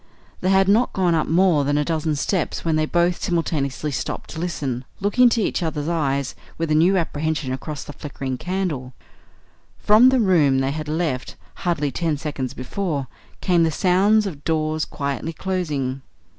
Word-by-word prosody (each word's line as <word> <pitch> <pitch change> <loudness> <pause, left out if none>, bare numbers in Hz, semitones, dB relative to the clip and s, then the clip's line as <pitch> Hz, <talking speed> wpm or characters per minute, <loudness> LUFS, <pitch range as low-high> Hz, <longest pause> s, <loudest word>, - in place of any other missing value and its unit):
They 185 - 0
had 190 0 +4
not 220 +5 +3
gone 180 -3 +2
up 160 -2 +1
more 170 -3 +3
than 145 +1 +1
a 150 - +1
dozen 155 -1 0
steps 170 +4 -1
when 160 -1 +2
they 155 0 +1
both 175 +1 +1
simultaneously 155 -4 -1
stopped 130 - -4
to - - -6
listen, 140 -8 -3 0.2
looking 205 +6 +3
into 235 -1 +4
each 195 - -1
other's 155 -3 -2
eyes 140 -5 0 0.2
with 165 -1 -2
a - - +4
new 175 +5 +4
apprehension 155 -5 -1
across 145 +2 -5
the 145 - -9
flickering 135 -2 -5
candle 180 -5 -2
flame. 125 0 -11 0.9
From 220 +5 +7
the 260 -1 +3
room 165 - +4
they 135 +1 +1
had 155 +1 -5
left 155 -5 -2 0.2
hardly 150 -5 -1
ten 160 -2 -1
seconds 140 -4 -4
before 145 +1 -3 0.4
came 175 -3 +3
the 165 - +3
sound 195 +6 +3
of 150 -7 -6
doors 155 -1 0
quietly 140 +3 -4
closing. 150 -8 -2
160 Hz, 175 wpm, -22 LUFS, 145-180 Hz, 0.9 s, From